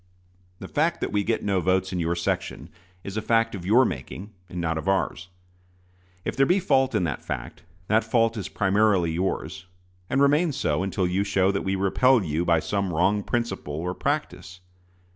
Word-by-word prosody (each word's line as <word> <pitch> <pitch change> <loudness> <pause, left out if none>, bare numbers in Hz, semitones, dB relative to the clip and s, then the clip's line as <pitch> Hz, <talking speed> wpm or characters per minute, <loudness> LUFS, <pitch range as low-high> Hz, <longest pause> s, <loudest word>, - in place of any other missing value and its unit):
The - - -8
fact 160 +3 0
that - - -2
we 105 0 +1
get 115 +2 -1
no 100 -3 +1
votes 95 +1 +1
in 90 - -1
your 85 +1 0
section 85 -2 -3 0.3
is 100 +2 -6
a - - 0
fact 115 +1 +1
of 90 -3 -6
your 120 +6 +5
making, 100 -1 -6 0.2
and 90 - -6
not 80 -1 -1
of 80 - -7
ours. 95 -1 -1
And 90 0 -13
if - - -13
there 135 0 +3
be 185 +3 +3
fault 135 -7 +2
in 100 - +2
that 75 -7 -3
fact, - - -6 0.3
that 110 +2 +3
fault 115 0 +1
is 100 -4 -5
primarily 95 -3 +2
yours, 90 0 -3 0.4
and 130 - +1
remains 145 +1 +3
so 75 - 0
until 95 -1 -1
you 90 +3 0
show 95 -1 +2
that 100 - -2
we 95 0 -1
repel 110 +5 +3
you 80 0 -1
by 85 -2 +3
some 100 +2 -2
wrong 95 +5 +2
principle 115 -10 -3
or 90 +4 -3
practice. 135 -9 -3
95 Hz, 195 wpm, -25 LUFS, 90-115 Hz, 0.4 s, your